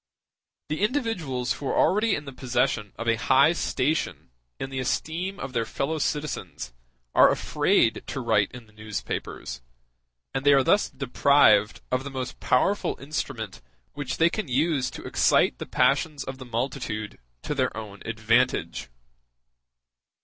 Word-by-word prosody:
The 155 - -2
individuals 180 - -1
who 140 - -6
are - - 0
already 210 +2 +3
in 145 - -6
the 135 - -8
possession 120 -4 0
of 115 - -6
a 115 -1 +3
high 135 +7 +4
station 160 - -1 0.3
in 135 - -5
the 135 - -3
esteem 175 +9 -2
of 135 -1 -6
their 115 -2 +1
fellow 155 +7 -2
citizens 150 - -3 0.4
are - - +7
afraid - - +2
to - - -4
write - - +2
in 125 -2 -10
the 105 - -23
newspapers, 105 - -5 0.7
and 135 - -2
they 145 0 +6
are 135 -1 +5
thus 205 +9 +3
deprived 130 -5 +3
of 130 +1 +1
the 140 - -5
most 130 -2 -5
powerful 195 +11 +1
instrument 135 -8 -5 0.3
which 140 -3 -4
they 165 +1 +4
can 215 -6 -3
use 140 +1 +1
to - - -9
excite - - +3
the - - -6
passions 150 -4 +1
of 130 0 -7
the 130 - -8
multitude 115 -3 -3 0.2
to - - -2
their 130 -3 -1
own 105 -2 -8
advantage. 115 - 0
135 Hz, 150 wpm, -26 LUFS, 120-150 Hz, 0.7 s, are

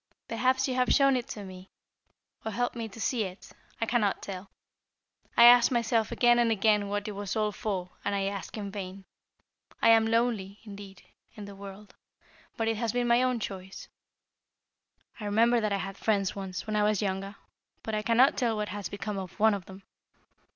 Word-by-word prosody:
Perhaps 255 +3 +1
you 260 - -1
have 250 0 +1
shown 275 -2 +5
it 245 -2 -2
to 205 - -7
me, 185 0 -11 0.7
or 220 - -3
helped 245 +4 -1
me 230 -2 -4
to 215 - -12
see 230 0 0
it. 185 -1 -9 0.3
I 225 - 0
cannot 220 -4 +1
tell. 195 0 -7 0.9
I 235 - +8
ask 240 +1 +8
myself 230 -2 +1
again 240 -1 +4
and 235 -1 +3
again 210 -1 +2
what 205 +1 -3
it - - -3
was 200 -1 -4
all 215 -1 +1
for, 190 -4 -4
and 200 - -1
I 195 - 0
ask 195 0 -4
in 200 -2 -5
vain. 195 -1 -7 0.7
I - - +4
am 225 -1 +6
lonely, 225 -4 0
indeed, 200 -3 -11 0.3
in 210 - -8
the 200 0 -10
world, 200 +1 -11 0.6
but 225 -2 -1
it 225 -1 0
has 230 0 -1
been 245 +1 0
my 235 +1 +4
own 255 -2 +1
choice. 190 -2 -7 1.3
I 210 - -6
remember 230 +3 +3
that 215 -1 -1
I 200 - +1
had 195 0 -6
friends 200 -3 0
once, 190 -2 -5
when 215 -1 -3
I 210 - +2
was 210 -1 +2
younger, 195 +1 -3 0.5
but 220 - -4
I 215 - 0
cannot 235 +5 +4
tell 235 -4 0
what 210 -1 -3
has 205 +1 -5
become 205 0 -4
of 190 +2 -9
one 220 0 +5
of 195 -3 -4
them. 190 0 -12
210 Hz, 200 wpm, -28 LUFS, 195-230 Hz, 1.3 s, I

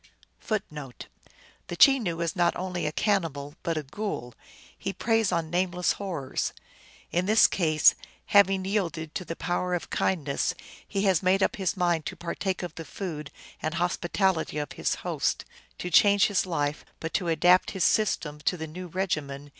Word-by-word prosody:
1 215 -2 +2
1 145 -4 -8 0.7
The 175 - -5
Chenoo 200 -8 +4
is 170 -1 -1
not 175 -2 +2
only 180 -3 -3
a - - -1
cannibal, 155 -8 -1
but 165 -1 -1
a 155 - -2
ghoul. 140 - -5 0.4
He 195 - -4
preys 225 -2 +1
on 165 -2 -1
nameless 180 0 +1
horrors. 170 -10 -3 0.6
In 180 +2 0
this 215 +2 +6
case, 155 -4 +4 0.2
" - - -31
having 195 -1 +5
yielded 170 -6 -2
to - - -3
the 165 - -5
power 180 +1 -1
of 175 - -5
kindness, 150 -7 0 0.3
he 195 -1 -1
has 190 -5 +3
made 190 +1 +3
up - - +1
his 190 -1 -1
mind 175 -4 +1
to - - -5
partake 185 +2 -3
of 175 -3 -5
the 165 - -7
food 150 -7 -6 0.3
and 155 +2 -2
hospitality 175 -1 0
of 150 -2 -3
his - - -1
hosts," - - -1 0.3
"to 180 - -5
change 200 +3 +6
his 195 -2 +1
life; 150 -4 -1 0.2
but 165 - -5
to 180 - 0
adapt 175 +3 +4
his 190 -3 -2
236 150 -8 +1
THE 165 -3 -4
ALGONQUIN 175 +2 -8
LEGENDS. 145 -6 -2
175 Hz, 170 wpm, -27 LUFS, 155-190 Hz, 0.7 s, this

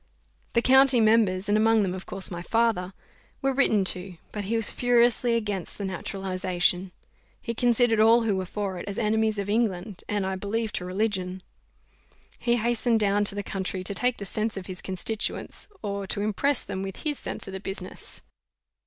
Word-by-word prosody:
The 235 - +3
county 265 -1 +6
members, 215 -4 +3
and 205 - +3
among 220 0 +4
them 185 -2 -1
of 185 0 -7
course 190 - -2
my 175 -1 -4
father, 215 -3 +1 0.5
were 270 0 +2
written 220 -7 +3
to; 180 -1 -9
but 210 -2 -4
he 225 +4 -1
was 225 -2 +4
furiously 240 -1 +3
against 205 -5 -3
the 200 - -4
naturalization: 185 -1 -1 0.5
he 235 - -4
considered 240 -1 +3
all 225 +2 +6
who 215 -3 +1
were 190 -1 -2
for 195 -2 -3
it 175 - -8
as 200 - -5
enemies 220 0 +1
to 200 -1 -2
England; 205 -3 -1
and, 205 -2 0
I 190 0 -1
believe, 215 +3 -2
to 180 - -2
religion. 185 -1 -2 1.0
He 235 0 +2
hastened 235 0 +1
down 205 0 +2
to 200 - +2
the 205 - -3
country 190 -1 -3
to 195 - -3
take 250 +4 0
the 200 - -6
sense 215 +2 -2
of 190 - -5
his 185 0 -6
constituents, 195 +3 -2 0.2
or 200 -1 -3
to 200 - -1
impress 240 +6 +1
them 190 -1 -5
with 195 -1 -6
his 300 -3 0
sense - - -5
of 195 - -7
the 190 - -4
business. 195 +1 -5
205 Hz, 190 wpm, -26 LUFS, 190-230 Hz, 1.0 s, county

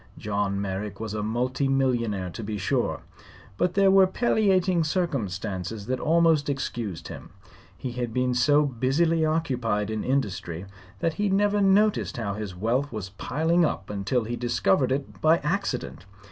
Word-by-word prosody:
John 100 -1 -1
Merrick 100 0 -4
was 110 -2 -4
a 105 - -2
multi 125 +5 -1
millionaire, 120 -9 0
to 110 - -7
be 105 0 -4
sure; 95 - -1 0.5
but 180 - 0
there 195 -1 +5
were 190 -1 +6
palliating 190 -5 +2
circumstances 110 - -2
that 130 +3 -2
almost 160 -2 +3
excused 120 - -4
him. - - -9 0.5
He 130 - -5
had 120 -1 -3
been 125 +1 0
so 145 +4 +4
busily 145 +6 +1
occupied 125 -10 0
in 110 -1 -2
industry 100 -9 -2 0.4
that 165 - +1
he 205 - +2
never 205 +1 +2
noticed 200 -2 +3
how 105 -4 -2
his 105 -3 -6
wealth 120 +9 0
was 105 -5 -5
piling 160 - 0
up 105 -10 -2
until 105 +5 -1
he 120 +2 -3
discovered 120 +1 +1
it 135 +1 -3
by 160 +1 +5
accident. 95 - -2
125 Hz, 155 wpm, -26 LUFS, 105-160 Hz, 0.5 s, were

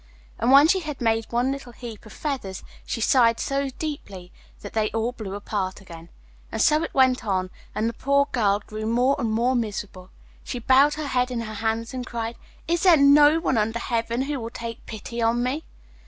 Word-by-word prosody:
And 240 +3 +2
when 280 +3 +8
she 380 +3 +3
had 305 -5 -6
made 225 -1 +1
one 245 +3 +1
little 275 -3 -7
heap 230 -3 -9
of - - -13
feathers, 260 -11 -4 0.2
she - - -3
sighed 230 -1 +4
so 275 0 -1
deeply 205 - -7 0.3
that 205 - -9
they 215 -1 +1
all 225 +2 0
blew 210 -5 -7
apart 200 -2 -3
again. 170 -3 -12 0.4
And - - -4
so 305 +1 +4
it 330 - -5
went 260 -2 +4
on, 185 -3 -1 0.2
and 220 - 0
the 230 - -2
poor 280 +3 +2
girl 205 -3 +1
grew 215 0 -5
more 250 +4 +2
and 235 -4 -1
more 235 +4 +2
miserable. 205 -5 -4 0.3
She - - -5
bowed 265 +5 +4
her 305 0 -4
head 250 -2 0
in 245 -2 -3
her 215 -1 -6
hands 225 +3 -2
and 255 -1 -4
cried, 235 -1 -4 0.3
'Is 340 +1 +1
there 355 -4 +6
no 290 +2 +6
one 265 -8 +1
under 225 +2 0
heaven 235 +1 -1
who 285 0 -3
will 230 -1 -5
take 230 0 -8
pity 235 +2 -6
on 230 +1 +2
me? 275 +6 -2
235 Hz, 205 wpm, -24 LUFS, 220-275 Hz, 0.4 s, when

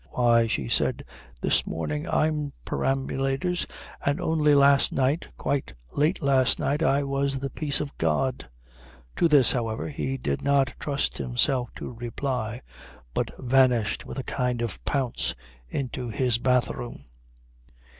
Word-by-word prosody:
"Why," 120 -2 +3
she 70 - -1
said, - - +1 0.4
"this - - +2
morning 75 -2 -3
I'm 150 -2 0
perambulators 135 +6 -1 0.4
and 145 +1 +1
only 150 -2 +3
last 140 0 +5
night, 135 +4 +1
quite 135 - -2 0.2
late 155 +4 +1
last 135 -2 +3
night, 145 +3 0
I 140 -3 +3
was 140 0 -1
the 135 0 -4
peace 145 -3 0
of 145 -2 -5
God." 85 - 0 0.7
To 170 - +4
this, 145 -6 +6
however, 115 -1 -2
he 135 -2 -3
did 70 - -2
not 140 -2 +2
trust 140 -1 -1
himself 125 0 +1
to - - -6
reply, 120 0 -3 0.5
but - - -1
vanished 125 -4 +2
with - - -8
a 135 - -2
kind 125 -3 -1
of 115 - -5
pounce 135 -4 -1 0.3
into 125 - -3
his 115 +1 +1
bathroom. 120 - 0
135 Hz, 135 wpm, -26 LUFS, 120-140 Hz, 0.7 s, this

